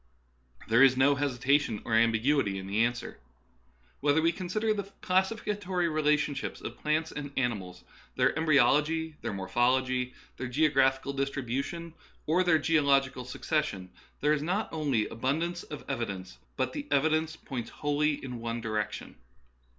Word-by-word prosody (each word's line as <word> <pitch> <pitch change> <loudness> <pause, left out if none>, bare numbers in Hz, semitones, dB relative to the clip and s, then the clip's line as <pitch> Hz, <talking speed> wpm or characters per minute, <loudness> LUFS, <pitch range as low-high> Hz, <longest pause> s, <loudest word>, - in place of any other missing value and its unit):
There 115 +2 +4
is 130 -1 +6
no 135 +2 +5
hesitation 140 -3 +1
or 115 - -3
ambiguity 115 -1 +3
in 95 - -6
the 100 +4 +1
answer. 120 0 -4 0.8
Whether 145 +2 +3
we 165 +1 +3
consider 205 +5 -1
the 200 -1 -5
classifi 190 +4 +1
catory 180 -4 -1
relationships 150 -2 0
of - - -8
plants 155 +1 0
and 145 -1 -6
animals, 100 -8 -2 0.3
their - - +2
embryology, 155 +1 +3
their - - -3
morphology, 125 +6 0 0.2
their 130 - -4
geographical 135 -1 +2
distribution, 140 +5 -3 0.3
or 170 +4 +3
their 175 -3 +4
geological 140 -5 +2
succession, 125 - -2 0.3
there 150 +1 +3
is 150 - 0
not 185 +7 -2
only 140 -9 0
abundance 160 +9 -2
of 150 - -9
evidence, 100 -9 -4 0.2
but 130 -1 -1
the 145 - -5
evi 145 +2 +3
dence 160 0 0
points 125 -7 -6
wholly 145 +1 0
in 125 -3 -6
one 115 0 -3
direction. 110 -2 -4
140 Hz, 145 wpm, -29 LUFS, 120-155 Hz, 0.8 s, is